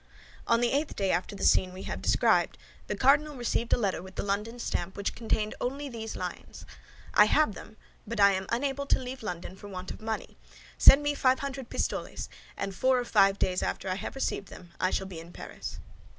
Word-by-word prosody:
On 230 0 +3
the 240 - +2
eighth 290 +2 0
day 195 -2 +1
after 180 +4 -1
the - - -6
scene 185 -1 +4
we 185 - -8
have - - -4
described, - - +3 0.3
the - - -2
cardinal 290 +3 +4
received 235 -1 -1
a - - +5
letter 200 -7 0
with 190 +1 -12
the - - -2
London 210 +4 -2
stamp 215 -4 -3
which 200 - -1
only 215 -2 -1
contained 275 +1 -4
these 225 -1 -5
lines: - - -6 0.5
"I 210 - +8
have 255 +1 +3
them; 215 - -11 0.3
but 230 0 -4
I 200 0 +7
am 190 0 -2
unable 275 +3 -1
to - - +4
leave 255 +1 -6
London 180 -3 -5
for 205 - -11
want 185 -2 -6
of - - -9
money. 220 0 -4 0.4
Send 285 +2 +9
me 290 0 +1
five 260 -2 +2
hundred 275 -3 -5
pistoles, - - -3 0.3
and 195 - -3
four 260 +7 +3
or 245 - -1
five 195 -3 +4
days 185 -2 0
after - - -2
I - - +1
have 190 - -5
received 235 -7 -2
them 175 -2 -12
I 185 - +2
shall 190 - -1
be 185 -4 -7
in 165 +1 -11
Paris." - - -7
220 Hz, 215 wpm, -29 LUFS, 190-260 Hz, 0.5 s, Send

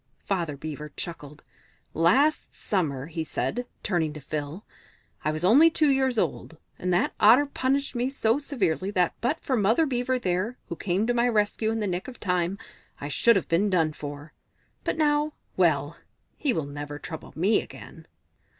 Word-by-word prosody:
Father 170 -7 -2
Beaver 150 0 -6
chuckled. 150 -3 -7 0.5
"Last 265 - +2
summer," 145 -10 -1
he 160 +1 -4
said, 245 +9 -3 0.2
turning 165 -6 0
to 150 - -8
Phil, 150 +6 -5 0.6
"I - - +1
was 155 +2 -3
only 270 - +7
two 310 -2 +2
years 265 -3 +2
old, 165 -5 -2 0.2
and 180 - -1
that 175 - +2
Otter 240 +7 +7
punished 275 0 -1
me 245 +1 0
so 250 -2 +1
severely 195 - -1
that 180 -4 +1
but 260 +8 0
for 265 - 0
Mother 225 +8 +3
Beaver 255 -1 0
there, 190 +2 -1
who 170 - -3
came 190 +4 0
to 245 - +1
my 240 0 +2
rescue 215 0 +1
in 225 0 -1
the - - 0
nick 180 -2 -3
of 255 -2 -9
time, 180 -1 0 0.4
I 145 - -5
should 230 - +4
have 195 - 0
been 185 +5 +2
done 165 -5 +2
for. 145 +1 -8 0.5
But - - -1
now 300 -1 +2 0.2
well, - - +2 0.4
he 290 - +1
will 160 -10 -1
never 145 +1 -6
trouble 160 +1 -8
me 190 +7 +3
again!" - - -12
195 Hz, 175 wpm, -26 LUFS, 160-245 Hz, 0.6 s, only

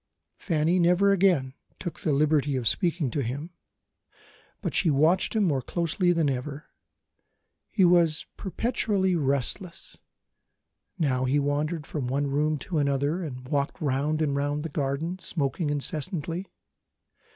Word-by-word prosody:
Fanny 165 +1 +1
never 180 +3 +4
again 175 -9 +3 0.2
took 175 - -6
the 155 - 0
liberty 145 -1 +2
of 125 -3 -1
speaking 165 - +1
to 145 - -1
him; 140 +8 -4 1.1
but - - -3
she 175 - +2
watched 155 +9 +3
him 215 - +3
more 145 -8 +1
closely 170 +4 0
than 165 -3 +2
ever. 140 +3 -3 1.0
He 190 - +3
was 170 -3 +4
perpetually 200 -2 0
restless. 145 - -2 1.0
Now 130 -6 +1
he 135 +3 +2
wandered 145 +2 -1
from 140 -4 -4
one 140 +3 0
room 150 +2 +1
to 165 0 -2
another, 140 +4 0
and 130 -6 -6
walked 140 -1 -1
round 150 +2 0
and 140 -2 0
round 145 +1 -1
the 165 - -4
garden, 150 +5 -2
smoking 155 -2 -2
incessantly. 160 +4 -3
150 Hz, 135 wpm, -27 LUFS, 140-175 Hz, 1.1 s, never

